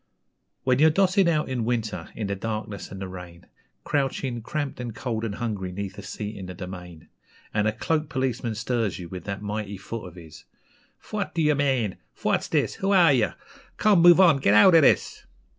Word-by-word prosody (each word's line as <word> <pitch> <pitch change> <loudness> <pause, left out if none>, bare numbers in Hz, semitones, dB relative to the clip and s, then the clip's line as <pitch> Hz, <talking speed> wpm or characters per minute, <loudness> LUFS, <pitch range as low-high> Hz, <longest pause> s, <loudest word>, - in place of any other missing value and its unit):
When 130 0 +2
you're 155 +2 +7
dossing 190 +2 +3
out 155 -3 +1
in 130 -3 -2
winter, 115 -2 -2
in 110 - -3
the 100 0 -2
darkness 105 0 -5
and 95 - -8
the 95 - -5
rain, 90 -2 -10 0.4
Crouching, 135 -4 -1
cramped, 145 +4 -4
and 120 -3 -5
cold 115 -4 -3
and 105 -3 -3
hungry 105 -6 -3
'neath 100 +1 -5
a - - -6
seat 105 +2 -6
in 95 - -7
The 90 - -8
Domain, 90 -3 -9 0.5
And 105 0 +1
a - - +2
cloaked 155 +7 -1
policeman 130 -5 -2
stirs 115 -2 -1
you 85 -2 -8
with 90 -1 -8
that 100 0 -5
mighty 105 -1 -4
foot 105 +1 -7
of 90 - -13
his 80 -3 -13 0.5
'Phwat 205 -5 -5
d'ye 155 -3 +3
mane? 135 -8 0 0.2
Phwat's - - 0
this? - - 0
Who 195 - +1
are 175 -6 +6
ye? 120 -5 +3 0.5
Come, 205 -5 +4
move 175 +1 +8
on 170 -6 +6
git 105 -6 +3
out 170 - +7
av 165 - +8
this!' 140 - +2
115 Hz, 195 wpm, -25 LUFS, 100-145 Hz, 0.5 s, move